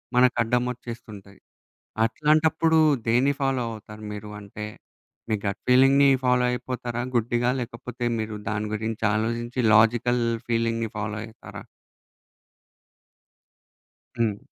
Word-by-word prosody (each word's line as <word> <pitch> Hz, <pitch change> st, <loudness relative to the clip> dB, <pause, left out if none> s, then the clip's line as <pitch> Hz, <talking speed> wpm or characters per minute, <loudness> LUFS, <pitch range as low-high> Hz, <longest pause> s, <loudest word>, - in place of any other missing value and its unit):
మనకడ్డమొచ్చేస్తుంటాయి. 120 Hz, -4 st, -1 dB, 0.7 s
అట్లాంటప్పుడు 155 Hz, +5 st, +2 dB, 0.3 s
దేన్ని 125 Hz, +5 st, +3 dB
ఫాలో 135 Hz, -2 st, +1 dB
అవుతారు 105 Hz, 0 st, -10 dB
మీరు? 105 Hz, 0 st, -7 dB
అంటే, 105 Hz, +1 st, -8 dB, 0.7 s
మీ -, -, +2 dB
గట్ 100 Hz, -, -2 dB
ఫీలింగ్‌ని 135 Hz, +2 st, +6 dB, 0.2 s
ఫాలో 125 Hz, 0 st, +3 dB
అయిపోతారా 120 Hz, -1 st, -4 dB
గుడ్డిగా? 120 Hz, +1 st, +1 dB
లేకపోతే 120 Hz, 0 st, -6 dB
మీరు 110 Hz, -1 st, -4 dB
దాని 105 Hz, 0 st, -2 dB
గురించి 110 Hz, +1 st, -3 dB
ఆలోజించి 115 Hz, +3 st, -2 dB
లాజికల్ 120 Hz, +2 st, +3 dB, 0.2 s
ఫీలింగ్‌ని 115 Hz, -1 st, 0 dB
ఫాలో 105 Hz, 0 st, -3 dB
అయితారా? 110 Hz, 0 st, -10 dB, 2.6 s
హ్మ్. 110 Hz, -3 st, +1 dB
120 Hz, 95 wpm, -25 LUFS, 110-125 Hz, 2.6 s, ఫీలింగ్‌ని